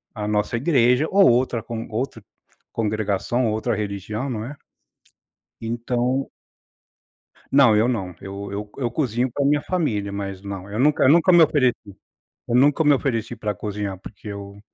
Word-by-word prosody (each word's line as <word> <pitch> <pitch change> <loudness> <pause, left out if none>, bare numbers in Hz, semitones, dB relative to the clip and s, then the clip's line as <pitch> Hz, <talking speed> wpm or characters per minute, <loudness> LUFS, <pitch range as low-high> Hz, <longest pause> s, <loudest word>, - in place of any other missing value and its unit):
a 105 -2 -4
nossa 105 +2 0
igreja 125 +1 +3
ou 195 -4 +6
outra 120 -1 +1
con 115 0 -6
outra 115 -1 -4 0.5
congregação 110 +2 -1
ou 110 - 0
outra 110 +1 -1
religião, 105 +4 -4
não 110 -3 -4
é. 140 +4 -7 1.1
Então 120 +3 -1 1.2
Não, 135 -5 +6
eu 110 +3 +3
não. 95 -8 -2
Eu 100 +1 -7
eu 105 +1 -5
eu 120 -3 -2
cozinho 125 -2 -1
pra 140 - -1
minha 145 +1 +2
família 110 - -1
mas, 100 -1 -5
não. 100 -1 -7
Eu 105 - -4
nunca 145 +4 +3
eu - - +6
nunca 170 +5 +5
me 175 -1 +8
ofereci. 130 -9 +1 0.5
Eu 120 - 0
nunca 145 +5 +4
me 145 -1 +5
ofereci 120 -4 -1
pra 105 -3 -3
cozinhar 100 -1 -4
porque 105 +2 -12
eu 100 0 -8
115 Hz, 165 wpm, -22 LUFS, 105-130 Hz, 1.2 s, me